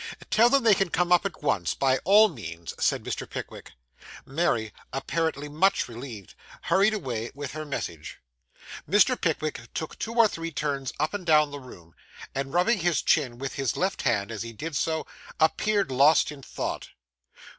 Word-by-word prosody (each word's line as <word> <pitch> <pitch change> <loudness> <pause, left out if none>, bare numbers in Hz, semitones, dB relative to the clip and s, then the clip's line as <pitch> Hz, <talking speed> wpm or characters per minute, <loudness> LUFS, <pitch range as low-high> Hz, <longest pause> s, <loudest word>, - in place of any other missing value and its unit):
'Tell 235 +2 +6
them 275 0 +3
they 225 -2 +6
can 195 -2 +1
come 175 +1 0
up 180 +3 +5
at 160 -5 -13
once, 85 - 0
by 135 -1 +2
all 210 +4 +7
means,' 85 - -8
said - - +1
Mr. - - -4
Pickwick. - - -8 0.5
Mary, 130 -7 0 0.2
apparently 150 +1 -2
much 180 +7 +2
relieved, 115 -4 -9 0.3
hurried 195 +5 +3
away 120 - -4
with 140 -1 -5
her 155 0 -6
message. 85 - -5 0.7
Mr. 210 +6 +5
Pickwick 155 - -2
took 160 - -5
two 230 +1 -4
or 230 -2 +6
three 165 -4 -5
turns 140 -3 -2
up 155 +1 0
and 205 -2 -4
down 150 -2 +4
the 145 - -6
room; 85 -11 -14 0.4
and, 135 0 -3
rubbing 190 +7 +2
his 175 -1 +1
chin 125 -6 +2
with 135 +1 -5
his 135 -2 -2
left 190 +2 -1
hand 100 0 0
as 110 - -5
he 115 0 -6
did 155 +6 -6
so, 160 +3 -1 0.3
appeared 200 +2 +2
lost 145 +4 +4
in 145 -2 -10
thought. - - -5
150 Hz, 175 wpm, -26 LUFS, 130-180 Hz, 0.7 s, all